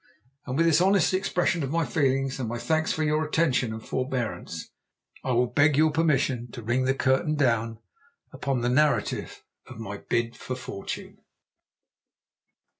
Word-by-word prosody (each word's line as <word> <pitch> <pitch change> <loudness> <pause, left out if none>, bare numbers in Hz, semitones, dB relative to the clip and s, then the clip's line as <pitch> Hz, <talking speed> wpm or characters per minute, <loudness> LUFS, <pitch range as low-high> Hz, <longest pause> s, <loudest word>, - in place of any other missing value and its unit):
And 130 +1 -2
with 165 - +4
this 165 0 +4
honest 190 -1 +3
expression 180 -2 +1
of 135 - -2
my 165 +2 +1
feelings, 135 0 0
and 120 -4 -2
my 120 - -3
thanks 160 +5 0
for 155 - -1
your 155 +1 +1
attention 150 -6 +1
and 110 0 -7
forbearance, 130 -2 -3 0.5
I 130 - -1
will 120 +1 +3
beg 145 +4 +3
your 155 +1 +4
permission 140 -6 +1
to 120 - -7
ring 120 +4 +1
the 135 +1 +2
curtain 135 +4 +1
down 115 -5 +1 0.6
upon 135 -3 -1
the 120 - +1
narrative 150 +4 +1 0.2
of 130 - -10
my 100 -3 -6
BID 115 +3 -1
FOR 130 - -5
FORTUNE. 125 -6 -7
135 Hz, 160 wpm, -26 LUFS, 120-155 Hz, 0.6 s, with